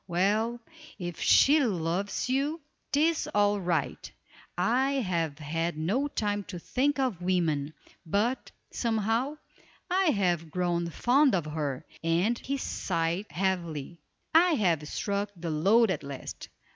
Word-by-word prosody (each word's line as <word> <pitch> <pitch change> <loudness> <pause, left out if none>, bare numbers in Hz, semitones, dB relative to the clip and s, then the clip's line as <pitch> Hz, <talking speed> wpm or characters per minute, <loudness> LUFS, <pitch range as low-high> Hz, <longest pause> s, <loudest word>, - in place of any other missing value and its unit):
Well, 210 +7 +1 0.4
if 175 -3 -6
she 295 +3 +5
loves 185 -1 -1
you, 280 +5 0 0.3
'tis 315 +3 +2
all 205 0 +3
right, 170 -5 -2 0.5
I 250 +9 +2
have 170 - -1
had 165 +2 -2
no 205 - 0
time 205 -6 -2
to 185 -1 -7
think 275 - 0
of 255 -10 -1
women; 160 -5 0 0.3
but, 210 +9 0 0.2
somehow, 230 +4 0 0.6
I 380 +1 +3
have 180 - +1
grown 170 0 -1
fond 255 - +3
of 170 -5 -1
her," 150 -4 -3 0.2
and 170 +8 +2
he 280 +1 -3
sighed 170 -5 -2
heavily. 170 -4 -2 0.3
"I 340 +2 +6
have 170 - +1
struck 200 +5 -2
the 170 -1 -4
lode 200 +8 +4
at - - -2
last. 140 -2 -8
190 Hz, 130 wpm, -28 LUFS, 165-240 Hz, 0.6 s, I